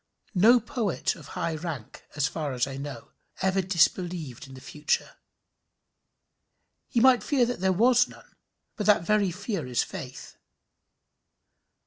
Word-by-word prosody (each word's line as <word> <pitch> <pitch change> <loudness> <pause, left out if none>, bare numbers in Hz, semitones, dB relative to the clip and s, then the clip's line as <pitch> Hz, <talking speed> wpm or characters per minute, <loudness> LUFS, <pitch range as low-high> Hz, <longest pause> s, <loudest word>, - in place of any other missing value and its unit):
No 225 +6 +6
poet 225 -4 -2
of 150 -4 -13
high 170 -1 -1
rank, 155 -7 -7
as 145 -1 +1
far 150 -4 -4
as 125 0 +1
I 135 -1 -7
know, 135 -3 -7 0.3
ever 190 0 +2
disbelieved 170 -6 0
in 135 - -12
the - - -10
future. 150 +3 -2 1.7
He 235 - 0
might 255 0 +6
fear 265 -4 +2
that 245 +1 -3
there 190 +1 +2
was 245 +6 +4
none; - - -16 0.4
but 210 - -3
that 205 -5 +5
very 210 -1 +2
fear 190 - -4
is 125 -1 +1
faith. 140 -9 -9
180 Hz, 140 wpm, -27 LUFS, 145-215 Hz, 1.7 s, No